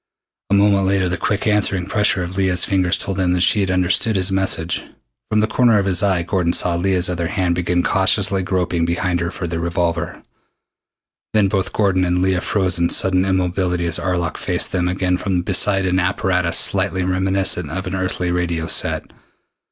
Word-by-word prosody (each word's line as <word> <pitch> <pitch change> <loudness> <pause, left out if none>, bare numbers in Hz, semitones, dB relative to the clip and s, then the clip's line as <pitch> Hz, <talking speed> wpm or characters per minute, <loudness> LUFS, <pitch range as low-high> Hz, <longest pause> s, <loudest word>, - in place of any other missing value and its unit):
A 100 - +2
moment 100 -1 +3
later 95 -1 +1
the 90 - -1
quick 100 +4 -2
answering 100 -4 +1
pressure 100 -1 +1
of 90 +1 -7
Leah's 95 -2 +2
fingers 95 -2 +1
told 95 -1 -4
him 90 -1 +1
that 90 - 0
she 105 - +4
had 95 -2 0
understood 90 +4 +1
his 95 0 +1
message. 95 -3 -1 0.5
From 105 0 +1
the 110 - +1
corner 115 0 +3
of 100 - 0
his 95 -1 +2
eye 95 -4 +1
Gordon 85 -1 -1
saw 90 - +1
Leah's 90 +1 +1
other 85 -1 -2
hand 95 -2 -1
begin 90 0 -1
cautiously 95 -1 +2
groping 90 -2 -1
behind 85 +1 -1
her 85 0 -2
for 90 - -6
the 85 -1 -4
revolver. 85 0 -3 1.1
Then 105 -2 +3
both 95 -1 -2
Gordon 95 -3 +1
and 90 0 0
Leah 95 -1 0
froze 95 -4 -1
into 85 0 +1
sudden 95 -1 +1
immobility 90 -1 -1
as 85 +1 0
Arlok 85 -1 -2
faced - - -1
them 90 -1 -1
again 90 0 -1
from 90 -2 -2
beside 95 +1 +2
an 90 0 +1
apparatus 90 -2 +1
slightly 95 -1 +1
reminiscent 95 -2 0
of 95 +5 -5
an 90 - -5
earthly 90 -1 -2
radio 85 -2 -2
set. 80 - -1
90 Hz, 190 wpm, -19 LUFS, 90-95 Hz, 1.1 s, she